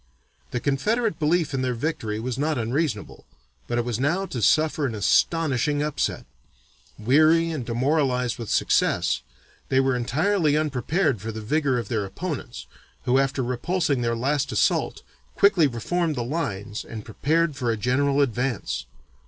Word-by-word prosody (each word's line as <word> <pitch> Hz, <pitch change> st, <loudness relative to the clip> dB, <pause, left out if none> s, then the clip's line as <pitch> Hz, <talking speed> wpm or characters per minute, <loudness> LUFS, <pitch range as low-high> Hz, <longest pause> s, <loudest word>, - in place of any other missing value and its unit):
The -, -, -2 dB
Confederate 210 Hz, -, 0 dB
belief 160 Hz, 0 st, +1 dB
in 135 Hz, -, 0 dB
their 125 Hz, -1 st, -1 dB
victory 115 Hz, -6 st, -3 dB
was 125 Hz, +2 st, -3 dB
not 150 Hz, 0 st, 0 dB
unreasonable, 120 Hz, -1 st, -2 dB, 0.4 s
but 120 Hz, -, -1 dB
it 120 Hz, -, 0 dB
was 120 Hz, -2 st, -2 dB
now 170 Hz, +8 st, +1 dB
to 125 Hz, -10 st, -5 dB
suffer 155 Hz, +3 st, +3 dB
an 115 Hz, -, -4 dB
astonishing 145 Hz, -, +2 dB
upset. 150 Hz, -1 st, -2 dB, 0.7 s
Weary 155 Hz, +8 st, +4 dB
and 150 Hz, -6 st, -3 dB
demoralized 125 Hz, 0 st, 0 dB
with 115 Hz, -, -6 dB
success, -, -, +2 dB, 0.5 s
they 130 Hz, -, +3 dB
were 135 Hz, -1 st, +2 dB
entirely 150 Hz, +6 st, +1 dB
unprepared 145 Hz, -, 0 dB
for 110 Hz, +2 st, -4 dB
the 110 Hz, -, -6 dB
vigor 140 Hz, +4 st, 0 dB
of 120 Hz, -, -3 dB
their 110 Hz, -4 st, -1 dB
opponents, 130 Hz, -, -5 dB, 0.4 s
who 130 Hz, +2 st, +3 dB
after 135 Hz, -1 st, 0 dB
repulsing 140 Hz, +3 st, 0 dB
their 115 Hz, -1 st, 0 dB
last 140 Hz, +4 st, 0 dB
assault, 105 Hz, -, +1 dB, 0.3 s
quickly 190 Hz, -6 st, +5 dB
reformed 155 Hz, +7 st, -1 dB
the 120 Hz, -, -2 dB
lines 105 Hz, -8 st, -3 dB
and 110 Hz, -2 st, -8 dB
prepared 155 Hz, +7 st, 0 dB
for 125 Hz, -2 st, -2 dB
a 115 Hz, -, 0 dB
general 140 Hz, +5 st, +1 dB
advance. 125 Hz, -, -1 dB
135 Hz, 155 wpm, -24 LUFS, 120-155 Hz, 0.7 s, quickly